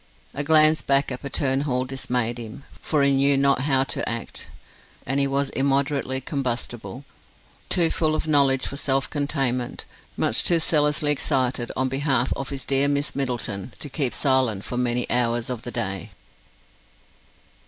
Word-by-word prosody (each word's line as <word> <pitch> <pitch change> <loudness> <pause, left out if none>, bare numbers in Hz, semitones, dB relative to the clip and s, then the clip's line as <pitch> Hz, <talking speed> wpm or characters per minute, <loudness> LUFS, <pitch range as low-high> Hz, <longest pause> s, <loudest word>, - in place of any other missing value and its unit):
A 145 - -3
glance 155 +1 +5
back 140 0 +1
at 130 - -5
Patterne 135 -1 0
Hall 130 -3 -1
dismayed 125 -2 -2
him, 115 +3 -9 0.2
for 150 -3 +1
he 140 - +4
knew 140 +1 +3
not 140 -1 +3
how 135 -1 +2
to - - -3
act, 115 0 -6 0.6
and 135 +2 0
he 140 - +3
was 140 0 -1
immoderately 135 -1 0
combustible, 130 -1 -4 0.6
too 170 -2 +3
full 155 -1 +1
of 160 - -3
knowledge 140 -3 +3
for 140 - -4
self 135 -1 0
containment; 135 -4 -2 0.3
much - - +2
too 170 - +4
zealously 150 -2 +2
excited 130 -4 0
on 130 +1 0
behalf 135 -2 +1
of 135 - -5
his 135 -2 -5
dear 135 +1 +2
Miss 145 0 -1
Middleton 120 -5 -3
to 145 - -5
keep 135 -2 0
silent 130 -8 +1
for - - -5
many 125 0 0
hours 120 0 0
of 120 -3 -4
the 120 - -6
day. 95 -7 -3
135 Hz, 160 wpm, -24 LUFS, 125-140 Hz, 0.6 s, glance